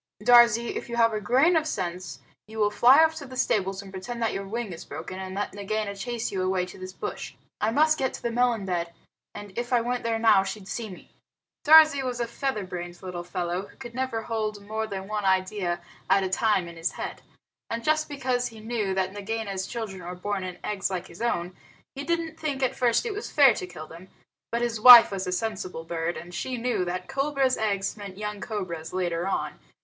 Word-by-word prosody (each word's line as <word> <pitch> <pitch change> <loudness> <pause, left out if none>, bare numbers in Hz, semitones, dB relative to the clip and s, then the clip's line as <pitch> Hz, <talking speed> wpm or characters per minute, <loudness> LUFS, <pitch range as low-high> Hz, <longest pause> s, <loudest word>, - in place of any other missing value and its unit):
Darzee, 235 -1 +6
if - - -7
you 235 - -3
have 230 -1 +4
a 215 - -2
grain 270 - +4
of 315 -1 +2
sense 180 - -4 0.3
you 220 +1 -10
will 210 -1 +2
fly 260 +8 +7
off 320 0 +3
to 290 - -7
the 255 0 -9
stables 195 -4 0
and 195 - -12
pretend 215 +6 -6
that 230 -2 0
your 195 0 -4
wing 225 -2 -4
is 165 - -9
broken, 165 +5 -7
and 190 0 -6
let 205 +1 -3
Nagaina 205 0 -3
chase 235 +3 -3
you 190 - -2
away 185 -1 0
to 180 - -12
this 185 0 -7
bush. - - -6 0.2
I 215 - +1
must 310 +6 +3
get 265 -1 0
to - - -10
the 235 - -1
melon 240 -3 +1
bed, 170 -2 -2 0.4
and 205 -2 -9
if 240 +1 -4
I 245 - +4
went 245 +1 -2
there 230 -1 0
now 220 -4 +5
she'd 195 0 -6
see 225 0 -4
me." 185 - -13 0.5
Darzee 310 -2 +8
was 250 -2 -3
a 235 - 0
feather 235 -2 -3
brained 175 -1 -7
little 180 -2 -5
fellow 175 +2 -3
who - - -20
could 235 - -9
never 250 -3 -2
hold 215 -3 -3
more 220 +1 -3
than 195 -2 -6
one 210 0 -2
idea 190 -2 0 0.3
at 195 - +4
a 190 - -1
time 195 -2 +1
in 170 -1 -10
his 165 +1 -2
head. - - -6 0.5
And 230 0 -3
just 310 +2 +1
because 255 -3 -1
he 225 -1 -11
knew 215 -3 -2
that 190 0 -1
Nagaina's 205 -2 -4
children 210 -6 -6
were 180 +1 -6
born 195 +1 -3
in 180 -1 -6
eggs 205 -2 -1
like 185 -1 -3
his - - -12
own, 180 -6 -1 0.4
he 280 - -6
didn't 330 0 -2
think 280 -4 -2
at 255 - +1
first 240 -2 +2
that 475 - -3
it - - -3
was 420 - -5
fair 275 -5 +6
to 180 - -5
kill 165 -3 -9
them. 170 +4 -13 0.4
But 235 +1 0
his 230 -3 -2
wife 245 -2 +11
was 190 -2 -3
a - - -1
sensible 185 -4 -3
bird, 165 +1 -3
and 175 +1 -9
she 250 +8 -3
knew 240 -5 0
that 180 +1 -4
cobra's 275 -1 +1
eggs 200 -3 -1
meant 200 -3 -9
young 210 -1 -5
cobras 170 -7 -5
later 175 -1 -1
on. 195 - -2
210 Hz, 225 wpm, -26 LUFS, 185-240 Hz, 0.5 s, wife